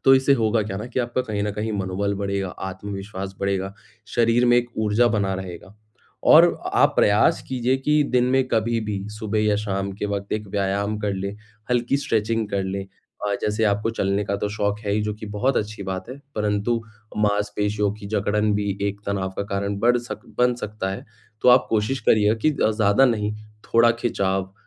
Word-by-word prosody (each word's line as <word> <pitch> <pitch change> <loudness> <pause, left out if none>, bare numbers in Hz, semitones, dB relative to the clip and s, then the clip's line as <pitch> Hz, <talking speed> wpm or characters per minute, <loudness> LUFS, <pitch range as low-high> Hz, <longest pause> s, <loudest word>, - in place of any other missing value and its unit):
तो 135 - +8
इससे 130 +1 +4
होगा 110 -2 +1
क्या 100 -2 -5
ना 105 - -5
कि 125 +1 -2
आपका 120 +1 -1
कहीं 105 -4 -3
न 105 - -1
कहीं 105 +1 -3
मनोबल 100 +2 -1
बढ़ेगा, 100 -1 -2
आत्मविश्वास 95 0 -6
बढ़ेगा, 100 0 -1 0.3
शरीर 120 +1 +2
में 120 0 +5
एक 120 0 +1
ऊर्जा 110 +2 +3
बना 100 -3 0
रहेगा। 95 +1 -8 0.5
और - - +8
अ - - -7
आप - - +4
प्रयास 105 +1 +4
कीजिए 130 0 +1
कि 150 +3 +2
दिन 125 -1 +4
में 130 0 +3
कभी 115 0 +1
भी 105 -2 -2 0.2
सुबह 110 -1 -1
या 105 -1 +3
शाम 100 -2 -2
के 105 - 0
वक़्त 100 0 -3
एक 105 -1 -2
व्यायाम 100 +2 -1
कर 105 -1 -1
लें, 100 +2 -4 0.3
हल्की 120 +2 +2
स्ट्रेचिंग 115 -4 0
कर 100 -1 0
लें। 95 +1 -3 0.4
अ, 100 - 0
जैसे 105 +1 0
आपको 105 +2 +1
चलने 100 -2 0
का 100 +1 -1
तो 105 - -2
शौक 105 0 -1
है 100 - +1
ही 105 0 +1
जो - - -4
कि 110 0 -9
बहुत 130 +6 +1
अच्छी 105 -1 -2
बात 95 +1 -5
है। 130 +2 -8 0.2
परंतु 105 +2 0 0.4
माँसपेशियों 105 0 0
की 105 -1 -10
जकड़न 105 0 +1
भी 100 -1 -1
एक 100 0 -6
तनाव 95 -1 -1
का - - -1
कारण 100 0 -2
बढ़ 120 +1 +4
सक 120 - -7 0.2
बन 125 0 +4
सकता 105 -4 -4
है। 95 - -6 0.4
तो - - +5
आप 125 +1 +6
कोशिश 115 +5 0
करिएगा 105 0 +4
कि 155 - +5
अ, 140 -7 +1
ज़्यादा 105 +3 +3
नहीं 105 -4 +1 0.3
थोड़ा 115 0 +4
खिंचाव, 95 -5 -1
105 Hz, 200 wpm, -23 LUFS, 100-115 Hz, 0.5 s, तो